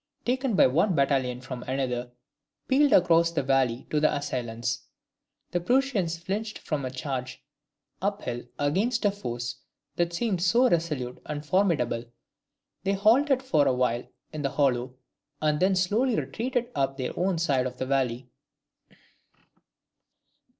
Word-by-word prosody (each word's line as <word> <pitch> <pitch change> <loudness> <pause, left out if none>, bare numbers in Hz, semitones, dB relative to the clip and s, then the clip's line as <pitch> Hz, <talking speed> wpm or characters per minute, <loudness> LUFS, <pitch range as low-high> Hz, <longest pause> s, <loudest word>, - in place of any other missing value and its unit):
taken 255 -2 0
by - - +6
one 165 +8 +2
battalion 135 -3 +1
from 130 -1 -7
another, 125 -2 -2 0.6
pealed 280 +1 +4
across 170 -1 +5
the 170 -4 -1
valley 130 -3 +1
to 150 - +2
the 155 - +3
assailants. 120 -5 -3 0.6
The 175 - +1
Prussians 205 -5 +1
flinched 205 +5 -4
from 150 -3 -3
a 130 - -2
charge 130 0 -5 0.6
up 200 +1 -1
hill 120 0 -4
against 210 - +1
a 205 - +4
force 120 -11 -5 0.4
that 175 0 +1
seemed 185 0 -1
so 235 +8 +4
resolute 150 - -1
and 150 0 -5
formidable; 145 -10 +1 0.8
they 195 - +1
halted 255 +7 +3
for 155 - +3
a 130 - +3
while 125 -1 0 0.3
in 155 - -4
the 140 - 0
hollow, 130 -3 0 0.4
and 150 -1 +1
then 190 +1 +3
slowly 215 +7 +2
retreated 245 +2 -2
up 135 -1 -1
their 130 -2 -3
own 185 0 0
side 140 -6 +1
of 125 0 -8
the - - -2
valley. 130 -2 0
150 Hz, 145 wpm, -27 LUFS, 130-200 Hz, 0.8 s, by